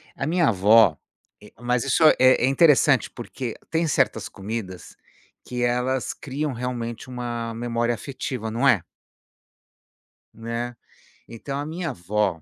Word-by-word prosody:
A -, -, -3 dB
minha 170 Hz, +1 st, +2 dB
avó 105 Hz, -3 st, +5 dB, 0.5 s
eh, 105 Hz, -, -15 dB
mas 125 Hz, 0 st, 0 dB
isso 140 Hz, +4 st, +1 dB
é 155 Hz, -, +7 dB
é 130 Hz, -1 st, +5 dB
interessante, 140 Hz, -1 st, +4 dB
porque 120 Hz, 0 st, -6 dB, 0.2 s
tem 165 Hz, 0 st, +1 dB
certas 140 Hz, -, 0 dB
comidas, 100 Hz, -2 st, -7 dB, 0.5 s
que 125 Hz, -1 st, -3 dB
elas 125 Hz, +2 st, 0 dB
criam 145 Hz, +1 st, -4 dB
realmente 120 Hz, 0 st, -5 dB
uma 120 Hz, -2 st, -4 dB
memória 120 Hz, 0 st, -1 dB
afetiva, 130 Hz, -3 st, -5 dB
não 120 Hz, +5 st, +1 dB
é? 100 Hz, -11 st, +4 dB, 1.5 s
Né, 115 Hz, +2 st, -5 dB, 0.5 s
então 135 Hz, +5 st, -6 dB
a 145 Hz, -, -3 dB
minha 165 Hz, +2 st, -4 dB
avó, 95 Hz, -, -1 dB
120 Hz, 130 wpm, -24 LUFS, 115-135 Hz, 1.5 s, é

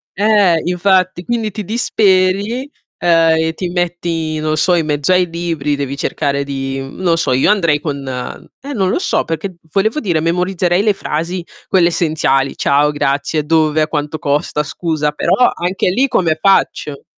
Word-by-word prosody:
eh, 200 Hz, -5 st, +3 dB
infatti. 185 Hz, 0 st, +1 dB
Quindi 225 Hz, -3 st, -1 dB
ti 210 Hz, +1 st, -5 dB
disperi, 200 Hz, 0 st, +1 dB, 0.4 s
uhm, 175 Hz, -, +1 dB, 0.3 s
e 160 Hz, 0 st, 0 dB
ti 180 Hz, -2 st, -3 dB
metti, 170 Hz, -3 st, -2 dB
non 155 Hz, 0 st, -1 dB
so, 180 Hz, +4 st, +2 dB
in 165 Hz, -3 st, +1 dB
mezzo 145 Hz, +3 st, 0 dB
ai 180 Hz, -1 st, +3 dB
libri, 165 Hz, -4 st, -2 dB
devi 140 Hz, -1 st, -3 dB
cercare 140 Hz, -2 st, -1 dB
di 135 Hz, -1 st, -4 dB
mhmm, 135 Hz, +5 st, -9 dB
non 170 Hz, -2 st, +2 dB
so 165 Hz, -5 st, 0 dB
io 130 Hz, +10 st, +3 dB
andrei 165 Hz, -8 st, +2 dB
con 140 Hz, -3 st, -5 dB
eh, 130 Hz, -, -7 dB
non 195 Hz, -5 st, 0 dB
lo -, -, 0 dB
so -, -, 0 dB
perché, 165 Hz, +3 st, -4 dB, 0.2 s
volevo 220 Hz, -, +1 dB
dire, 175 Hz, -, 0 dB
memorizzerei 180 Hz, +2 st, +1 dB
le 210 Hz, -1 st, +2 dB
frasi 170 Hz, +1 st, -4 dB, 0.2 s
quelle 180 Hz, -3 st, +3 dB
essenziali, 150 Hz, -5 st, 0 dB
"ciao", 145 Hz, +1 st, +2 dB
"grazie", 145 Hz, +2 st, -1 dB
"dove", 155 Hz, -1 st, +2 dB
"a 155 Hz, -, +1 dB
quanto 150 Hz, 0 st, -3 dB
costa" 150 Hz, 0 st, -1 dB
"scusa", 155 Hz, -1 st, -2 dB
però 150 Hz, -, +1 dB, 0.2 s
anche 180 Hz, +2 st, -1 dB
lì 260 Hz, +7 st, +2 dB
come 170 Hz, -10 st, +1 dB
faccio? 150 Hz, -7 st, +1 dB
165 Hz, 170 wpm, -16 LUFS, 150-185 Hz, 0.4 s, eh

